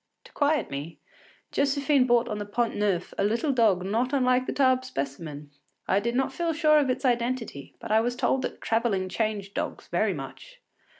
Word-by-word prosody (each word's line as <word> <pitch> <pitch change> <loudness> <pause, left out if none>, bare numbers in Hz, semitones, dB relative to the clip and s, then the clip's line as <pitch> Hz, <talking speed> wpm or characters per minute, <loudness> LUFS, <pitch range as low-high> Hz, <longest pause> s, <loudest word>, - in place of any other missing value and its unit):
To - - -17
quiet 295 - +1
me, 145 +4 -6 0.5
Josephine 280 -1 +2
bought 240 -1 +3
on 210 - -3
the 205 - -4
Pont 235 +2 -1
Neuf 200 -4 -1
a - - +3
little 235 +9 +1
dog 215 -8 +3
not 235 +7 0
unlike 255 -1 +2
the - - -1
Tarbes 260 -2 +2
specimen. 145 - -5 0.4
I 195 - +3
did 235 +3 -2
not 265 +1 0
feel 335 -1 -1
sure 305 -1 +4
of 280 -3 +1
its 255 - -1
identity, 240 - -1
but - - -7
I 220 +1 +5
was 245 +1 -1
told 260 +1 +1
that - - -5
travelling 225 -5 0
changed 205 -2 -2
dogs - - -4
very - - +1
much. - - -10
235 Hz, 190 wpm, -27 LUFS, 200-265 Hz, 0.5 s, I